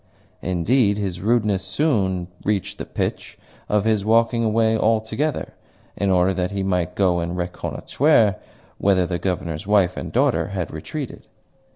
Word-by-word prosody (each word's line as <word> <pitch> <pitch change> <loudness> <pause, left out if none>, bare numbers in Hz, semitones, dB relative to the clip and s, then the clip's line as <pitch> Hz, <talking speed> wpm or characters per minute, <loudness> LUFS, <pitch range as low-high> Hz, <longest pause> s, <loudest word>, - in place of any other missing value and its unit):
Indeed, 100 +5 +2
his 95 -4 -3
rudeness 105 -3 +1
soon 95 - 0 0.2
reached 100 -2 -2
the - - -5
pitch - - -4 0.3
of 105 0 +2
his 110 -3 +2
walking 115 +2 +3
away 110 0 +2
altogether, 110 +7 0 0.4
in 100 0 0
order 95 0 +3
that 90 -1 -1
he 100 -1 -3
might 90 -2 -1
go 90 -3 +2
and 85 +1 -3
reconnoitre 105 - +1 0.4
wither 95 -2 +3
the 85 0 -3
Governor's 90 -1 -3
wife 100 -4 +3
and - - -5
daughter - - +2
had - - -4
retreated. - - -7
100 Hz, 145 wpm, -22 LUFS, 90-110 Hz, 0.4 s, walking